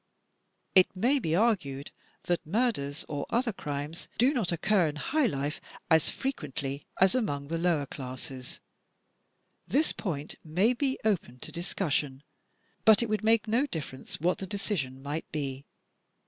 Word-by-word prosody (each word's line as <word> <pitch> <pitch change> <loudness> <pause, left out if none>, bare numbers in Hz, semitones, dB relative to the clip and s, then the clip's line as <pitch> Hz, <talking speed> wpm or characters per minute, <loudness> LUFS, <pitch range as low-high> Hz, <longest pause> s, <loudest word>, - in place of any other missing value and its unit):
It 185 0 +6
may 250 +9 +3
be 160 -9 0
argued 170 - +1 0.3
that 175 -1 0
murders 165 - 0
or 145 -2 -3
other 235 -1 +1
crimes 150 -1 -5
do 255 +5 +4
not 220 - 0
occur 185 +1 +3
in 150 - -3
high 285 - +1
life 145 -4 -2 0.3
as 160 -1 +5
frequently 140 - -3
as 190 0 +6
among 145 - -1
the 165 0 -1
lower 165 -4 +2
classes. 130 -1 -7 1.1
This 305 +3 +3
point 150 -7 -4
may 185 +10 +3
be 265 +1 0
open 180 - 0
to - - -7
discussion; 150 -6 -1 0.6
but 220 +1 +7
it 235 - -2
would 215 0 0
make 225 0 +4
no 240 +7 +2
difference 145 - -6
what 175 +4 +1
the 190 - -5
decision 170 -11 -2
might 145 +3 -4
be. 140 -3 -3
170 Hz, 145 wpm, -29 LUFS, 145-220 Hz, 1.1 s, but